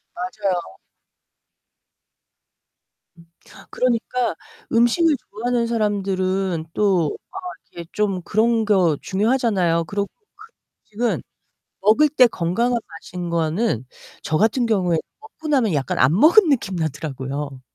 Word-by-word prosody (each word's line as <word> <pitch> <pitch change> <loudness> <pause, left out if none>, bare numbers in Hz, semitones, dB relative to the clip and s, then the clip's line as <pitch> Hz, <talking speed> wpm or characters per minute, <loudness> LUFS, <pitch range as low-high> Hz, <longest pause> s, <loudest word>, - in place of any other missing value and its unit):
맞아요. 185 0 -2 2.5
음. 170 - -17 0.4
그러니까 245 -3 0 0.4
음식을 265 +8 +3
좋아하는 235 +3 -1
사람들은 195 -5 -1
또 185 -8 +1 0.2
아 - - -17 0.4
이렇게 170 -1 -9
좀 195 -4 -1
그런 225 +5 +1
거 185 -7 +3
중요하잖아요. 195 -6 +1
그리고 200 +5 -2
그런 440 0 -19 0.5
음식은 235 - 0 0.6
먹을 220 +10 +4
때 260 -4 +5
건강한 230 +6 0
맛인 175 +1 -7
거는 165 - 0 0.4
저 155 - 0
같은 225 +5 +2
경우에는 185 -7 +1 0.2
먹고 435 -7 -11
나면 255 - +2
약간 140 -3 -1
안 140 +7 +4
먹은 340 - +6
느낌 230 -9 0
나더라고요. 145 -3 -4
200 Hz, 255 characters per minute, -21 LUFS, 170-235 Hz, 2.5 s, 먹은